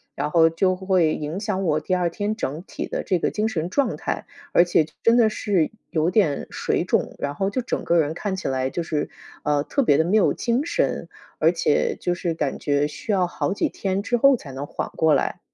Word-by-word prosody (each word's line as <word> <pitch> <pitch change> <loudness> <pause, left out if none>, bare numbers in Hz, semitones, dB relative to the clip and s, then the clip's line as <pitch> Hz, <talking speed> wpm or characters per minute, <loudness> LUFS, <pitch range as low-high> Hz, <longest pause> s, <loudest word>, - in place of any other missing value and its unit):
然 150 - -2
后 165 -1 +5
就 185 +3 +1
会 185 -4 +2
影 155 +5 -4
响 205 -3 -2
我 155 -4 +2
第 155 +4 -3
2 175 -2 +2
天 205 +5 -2
整 160 -6 -4
体 - - -6
的 - - -3
这 185 -3 0
个 - - +1
精 215 +1 -1
神 175 -6 -2
状 275 +8 0
态， - - -3 0.3
而 - - +6
且 170 -2 +3 0.2
真 230 +1 +5
的 230 -3 +5
是 200 -6 0 0.2
有 160 +1 +1
点 180 -8 +1
水 - - -1
肿， - - 0
然 145 0 -3
后 195 +5 -1
就 255 - -1
整 245 - -3
个 170 0 +3
人 155 +1 0
看 200 -1 -2
起 190 - -4
来 130 0 -1
就 170 - -2
是， 155 -2 -2 0.3
呃， 145 -1 +1
特 275 - 0
别 145 - +4
的 - - +5
没 195 +6 +2
有 205 - +3
精 245 +5 0
神， - - -1 0.3
而 - - +4
且 465 -2 +1
就 175 0 0
是 170 -2 -2
感 150 -4 -2
觉 145 0 +1
需 180 +8 -5
要 185 -3 +2
好 175 - -2
几 - - 0
天 195 0 -2
之 240 +3 0
后 275 +3 +6
才 150 - -9
能 135 +2 -5
缓 - - -4
过 160 -1 +3
来。 - - 0
180 Hz, 245 characters per minute, -23 LUFS, 155-210 Hz, 0.3 s, 而